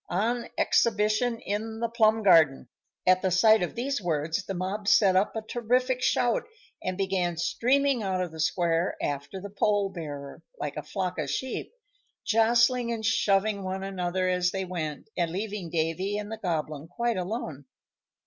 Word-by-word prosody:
ON 230 +6 0
EXHIBITION 220 +2 +2
IN 220 +2 -3
THE 235 - 0
PLUM 220 -1 +2
GARDEN!" 160 -9 +5 0.4
At 185 0 +4
the 190 - +1
sight 215 +4 +5
of 175 - -2
these 260 +1 -2
words 160 +1 -1
the 195 - -3
mob 195 +3 -3
set 205 -3 +5
up 195 +4 +2
a 220 - -3
terrific 250 +3 0
shout, 245 -2 +2 0.4
and 185 0 -3
began 185 -3 0
streaming 260 - +2
out 190 -2 -1
of 180 -2 -2
the 160 - -10
square 170 +1 +1
after 145 +6 -3
the 200 +1 -8
pole 205 0 +1
bearer, 145 -6 -7 0.2
like - - -4
a - - -3
flock 185 -3 -3
of 145 -2 -2
sheep, 260 - -3 0.5
jostling 235 +2 +3
and 225 -2 -3
shoving 200 -2 +2
one 190 +1 -3
another 185 -1 -1
as 180 -1 +2
they 190 0 -3
went, 160 -5 -5
and 170 -2 0
leaving 200 0 -4
Davy 170 +5 -1
and 210 0 -5
the 225 - -5
Goblin 155 -5 -3
quite 235 +5 -1
alone. 180 - -4
195 Hz, 170 wpm, -27 LUFS, 175-220 Hz, 0.5 s, GARDEN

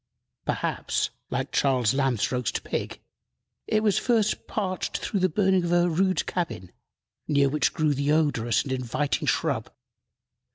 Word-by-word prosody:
Perhaps, - - -1 0.2
like 130 +2 -2
Charles 130 -4 +2
Lamb's 135 -5 +1
roast 125 -2 -1
pig, - - -4 0.7
it 215 0 +1
was 205 -2 +3
first 225 -4 +1
parched 185 -4 -2
through 200 - -2
the 185 0 +2
burning 190 +1 +2
of 170 - -1
a 175 0 +4
rude 185 +3 +1
cabin, 95 - -3 0.6
near 140 -1 +3
which 150 +2 +1
grew 155 -3 +1
the 140 +1 0
odorous 125 -9 +2
and 135 - -6
inviting 130 +3 -1
shrub. - - 0
150 Hz, 140 wpm, -26 LUFS, 130-185 Hz, 0.7 s, a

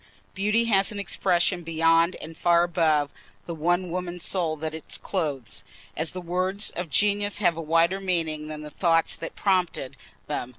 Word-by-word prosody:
Beauty 210 +4 +2
has 200 -3 +3
an 210 - -6
expression 185 -2 +1
beyond 165 +1 +3
and 160 +1 -9
far 170 +1 +4
above 155 -4 +2 0.3
the 170 - -5
one 175 +3 0
woman's 180 -1 -4
soul 170 -5 0
that 155 +1 -4
it 160 -1 -4
clothes, 145 - -2 0.3
as 160 -1 -1
the 185 - -6
words 185 +4 0
of 175 -2 -5
genius 205 +4 +1
have 180 -5 +2
a 165 - -4
wider 165 +4 +2
meaning 160 -5 -1
than 155 0 -6
the 150 - -9
thought 165 0 +2
that 165 - -6
prompted 180 -9 0 0.3
them. 125 - -3
170 Hz, 170 wpm, -26 LUFS, 160-185 Hz, 0.3 s, far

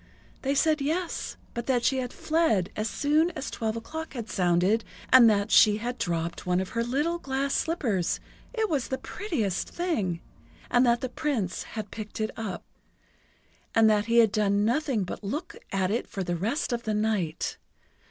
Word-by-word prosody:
They 275 +1 0
said 305 +1 +3
yes, 330 +5 -2 0.2
but 235 0 -4
that 250 -3 +2
she 265 - +3
had 250 -1 -2
fled 310 - +1
as 215 +1 -1
soon 305 +3 +2
as 280 - -4
twelve 220 -2 -2
o'clock 315 +8 -6
had 230 -3 -5
sounded, 180 +4 +2 0.3
and 245 -3 +9
that 205 0 +1
she 210 -1 +7
had 240 +3 -4
dropped 170 -1 -2
one 180 0 +1
of 190 -1 -3
her 230 - -1
little 295 +8 0
glass 275 -1 -1
slippers 230 - 0 0.3
it 445 -3 0
was 290 -9 -1
the 260 - -2
prettiest 260 - -2
thing! 220 - -1 0.5
and 245 +1 +5
that 235 0 +3
the 255 - -2
Prince 245 - -2 0.2
had 215 -2 -4
picked 215 0 -7
it 215 0 -1
up. 215 -5 -5 1.1
And 225 -1 +6
that 210 -1 +2
he 235 +1 +2
had 225 -3 +6
done 205 -1 +2
nothing 250 -2 +1
but 180 - -6
look 295 - -4 0.2
at 190 -1 +1
it 235 - -1
for 195 - -4
the 175 -1 -1
rest 230 - -1
of 235 - -1
the 220 -2 -1
night! 210 -7 -1
230 Hz, 180 wpm, -27 LUFS, 205-280 Hz, 1.1 s, and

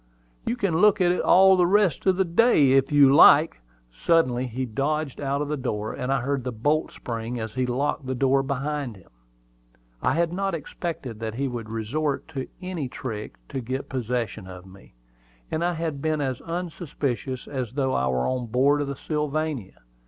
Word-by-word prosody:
"You 235 - +1
can 195 -9 0
look 210 +3 +5
at 175 -1 +4
it 180 - 0
all 190 +1 +6
the 180 -1 +3
rest 195 -3 +2
of 190 - +5
the 190 - +2
day, 170 - +4
if 135 +1 +3
you 140 -2 +6
like." 145 - +6 0.3
Suddenly 125 - +1
he 125 +2 -3
dodged 140 +5 -2
out 140 +1 -1
of - - -5
the 150 - -1
door, 110 -6 -3
and 125 +1 -3
I 135 - +1
heard 135 +1 -1
the 125 - -3
bolt 145 +8 0
spring 115 0 -5
as 110 -1 -5
he 130 -1 -1
locked 135 +2 -1
the 130 - -2
door 135 +1 +3
behind 140 -2 -3
him. 95 - -19 0.9
I - - +1
had 170 0 +1
not 195 -1 -1
expected 145 -7 -6
that 110 -1 -4
he 135 +2 -1
would 120 -4 -6
resort 135 +7 -2
to 135 -5 -5 0.2
any 180 -7 -3
trick 110 -5 -6
to 135 - -4
get 130 +3 -4
possession 120 -6 -3
of 90 -1 -10
me; 95 -8 -17 0.6
and 160 - -1
I 175 0 +1
had 160 -4 -3
been 155 0 0
as 130 -3 -2
unsuspicious 150 -7 -4
as 130 -5 -4
though 135 -2 0
I 65 - +1
were 65 -1 0
on 130 -2 -2
board 135 +5 +2
of 145 - -2
the 140 - -4
Sylvania. 150 - -3
135 Hz, 195 wpm, -25 LUFS, 125-155 Hz, 0.9 s, all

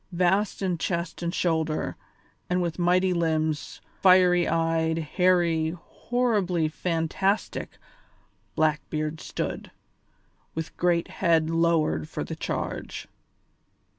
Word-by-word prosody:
Vast 185 +4 +1
in 180 -3 0
chest 170 -1 -2
and 170 0 -1
shoulder, 160 - -1 0.5
and 180 0 +1
with 175 -1 -2
mighty 180 +1 +3
limbs, 160 -3 -1 0.2
fiery 180 -2 +5
eyed, 165 0 +1
hairy, 170 0 +1
horribly 205 -7 0
fantastic, 170 +5 -1 0.8
Blackbeard 155 0 0
stood, - - -4 0.9
with 160 0 -5
great 175 -1 +1
head 165 -3 +2
lowered 165 - +1
for - - -4
the - - -6
charge. - - -4
170 Hz, 100 wpm, -26 LUFS, 160-180 Hz, 0.9 s, fiery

